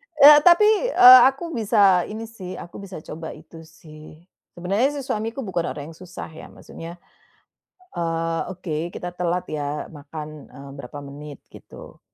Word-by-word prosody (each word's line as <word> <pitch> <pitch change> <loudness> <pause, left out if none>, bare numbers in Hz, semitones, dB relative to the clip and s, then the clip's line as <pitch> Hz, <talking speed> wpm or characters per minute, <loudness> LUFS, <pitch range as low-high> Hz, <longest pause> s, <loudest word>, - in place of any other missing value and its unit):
Eee, 295 0 +9
tapi, 350 +5 +6 0.2
eee, 255 - +9
aku 305 +5 -8
bisa 205 -5 +3
ini 215 +2 -7
sih, 190 -5 -9
aku 170 - -10
bisa 195 -2 -9
coba 160 +1 -8
itu 160 +1 -14
sih. 155 -1 -15 0.4
Sebenarnya 195 +9 0
si - - -4
suamiku 225 +3 -4
bukan 175 -4 -2
orang 145 +2 -8
yang 160 - -16
susah 180 -2 -9
ya, 160 - -11
maksudnya 165 +1 -11 1.0
eee, 165 -1 -2
"Oke, 170 -3 -5
kita 180 0 -7
telat 180 0 -2
ya 150 -1 -4
makan," 150 0 -10
eee, 140 0 -12
"berapa 140 +1 -9
menit," 145 0 -10
gitu. - - -14
170 Hz, 155 wpm, -22 LUFS, 155-215 Hz, 1.0 s, Eee